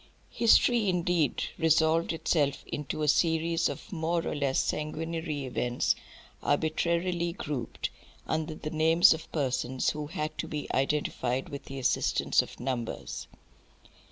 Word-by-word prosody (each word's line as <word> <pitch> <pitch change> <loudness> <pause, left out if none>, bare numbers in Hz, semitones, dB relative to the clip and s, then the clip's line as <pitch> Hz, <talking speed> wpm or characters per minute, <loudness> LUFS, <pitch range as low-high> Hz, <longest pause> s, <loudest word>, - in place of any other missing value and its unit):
History 230 -2 +4
indeed 175 -5 +1 0.2
resolved 160 +1 +3
itself 150 -3 0
into 150 +1 -4
a - - +1
series 165 +2 +2
of - - -8
more 165 0 0
or - - -1
less 140 -2 +1
sanguinary 155 -1 -2
events 125 -1 0 0.5
arbitrarily 170 +3 0
grouped 145 - -4 0.3
under 155 0 -2
the 155 0 -6
names 160 +2 +6
of 160 0 -8
persons 130 -3 0
who 150 -1 -5
had 155 0 -3
to - - -2
be 150 -1 -4
identified 135 -2 0
with 140 -2 -7
the 135 - -7
assistance 130 - +2
of - - -10
numbers. 120 -2 -4
155 Hz, 130 wpm, -29 LUFS, 140-165 Hz, 0.5 s, names